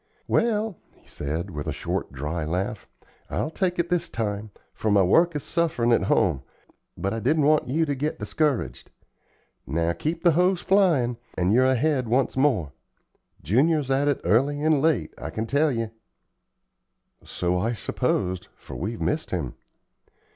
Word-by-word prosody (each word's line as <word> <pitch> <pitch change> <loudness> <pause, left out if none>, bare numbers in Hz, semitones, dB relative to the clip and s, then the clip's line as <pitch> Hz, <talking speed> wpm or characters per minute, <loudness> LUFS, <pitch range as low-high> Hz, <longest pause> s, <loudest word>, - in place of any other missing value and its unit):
"Well," 220 -4 +1 0.2
he - - -27
said, 80 +6 -4
with 75 -3 -5
a - - 0
short, - - -3
dry 75 +5 -3
laugh, 90 +6 -3 0.4
"I'll 155 - -2
take 180 0 -1
it 170 0 -1
this 170 -1 0
time, 105 -3 -3 0.2
for 110 - -2
my 100 -2 +5
work 165 - +4
is 145 - -3
sufferin' 160 -9 0
at 115 - +3
home, 85 -8 +2 0.6
but 95 +4 -2
I 115 - -2
didn't 145 +6 +2
want 155 +1 +3
you 160 +6 +1
to 145 - -1
get 145 +3 -2
discouraged. 150 -5 -1 0.8
Now, 85 +1 0
keep 160 - -3
the 175 - +6
hoes 180 +2 +2
flyin', 165 - +3 0.2
and 90 +3 +2
you're 130 +2 +5
ahead 130 0 +2
once 125 +4 +1
more. 130 - +2 0.7
Junior's 135 - +2
at 140 +2 +2
it 145 - +1
early 145 +6 +2
and 155 -3 +3
late, 150 - +1
I - - -5
can 110 - -3
tell 145 +5 +2
ye." 115 -3 -2 1.3
"So 90 0 -1
I 115 +6 0
supposed, 90 -2 -1
for - - -11
we've 105 +7 -4
missed 155 +1 -1
him." 80 -9 -3
130 Hz, 160 wpm, -25 LUFS, 95-155 Hz, 1.3 s, the